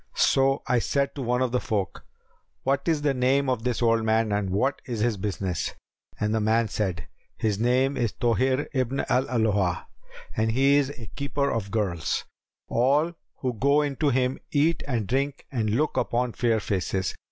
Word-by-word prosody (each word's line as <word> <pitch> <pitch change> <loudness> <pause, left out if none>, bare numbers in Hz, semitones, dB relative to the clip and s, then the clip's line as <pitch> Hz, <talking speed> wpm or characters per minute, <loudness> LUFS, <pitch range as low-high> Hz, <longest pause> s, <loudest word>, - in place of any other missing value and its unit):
So 135 +1 +3
I 125 -1 +2
said 140 +4 0
to 140 - -6
one 125 +1 +1
of 125 - -1
the 125 - +1
folk, 100 -5 -3 0.6
'What 135 +4 0
is 155 -3 +1
the 145 -2 +2
name 135 +2 +2
of 125 -3 0
this 120 0 -1
old 115 -1 +3
man 110 0 +2
and 100 -1 0
what 125 +9 0
is 115 -4 -3
his 115 -1 +2
business?'; 95 -3 -3 0.4
and 105 0 0
the 110 - +2
man 110 +1 +2
said, 95 -7 -2 0.3
'His 105 -2 0
name 130 +4 +2
is 120 -3 0
Tбhir 130 +3 +1
ibn 130 0 0
al 130 +2 +2
Alбa, 105 -7 +1 0.5
and 110 +1 +1
he 135 +3 +4
is 140 -2 +2
a 125 -5 -9
keeper 140 0 -1
of 110 -3 -2
girls: 95 -8 -1 0.4
all 145 +8 +2 0.3
who 125 -2 -1
go 140 +6 +3
into 145 +1 0
him 130 0 +1
eat 155 +3 +2
and 120 -6 -1
drink 135 +5 -1
and 115 -5 0
look 145 +9 0
upon 120 0 0
fair 115 -2 +1
faces.' 95 -1 -2
120 Hz, 180 wpm, -26 LUFS, 110-135 Hz, 0.6 s, he